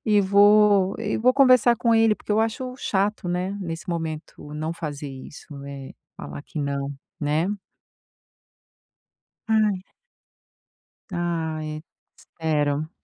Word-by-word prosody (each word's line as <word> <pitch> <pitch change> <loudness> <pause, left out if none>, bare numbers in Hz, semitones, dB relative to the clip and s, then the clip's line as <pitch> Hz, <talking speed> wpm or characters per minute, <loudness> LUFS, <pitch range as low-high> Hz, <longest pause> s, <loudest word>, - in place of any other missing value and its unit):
E 210 -1 +5
vou 205 0 +5
e 215 -2 -2
vou 250 +3 +4
conversar 255 -3 +6
com 230 0 +2
ele, 225 -1 +4
porque 210 - -4
eu 215 - +3
acho 250 +3 -2
chato, 200 -3 -1
né, 180 +3 -2
nesse 170 -1 -6
momento, 160 -3 -5
não 155 +2 -3
fazer 150 -3 -5
isso, 135 +2 -10 0.2
eh, 140 -1 -8 0.2
falar 70 0 -8
que 155 - -8
não, 140 0 -2 0.3
né? 155 +5 +1 2.0
Ai 215 -2 +3 1.4
Ai, 160 -3 -3 0.3
espero. 155 -1 -1
175 Hz, 115 wpm, -24 LUFS, 155-210 Hz, 2.0 s, conversar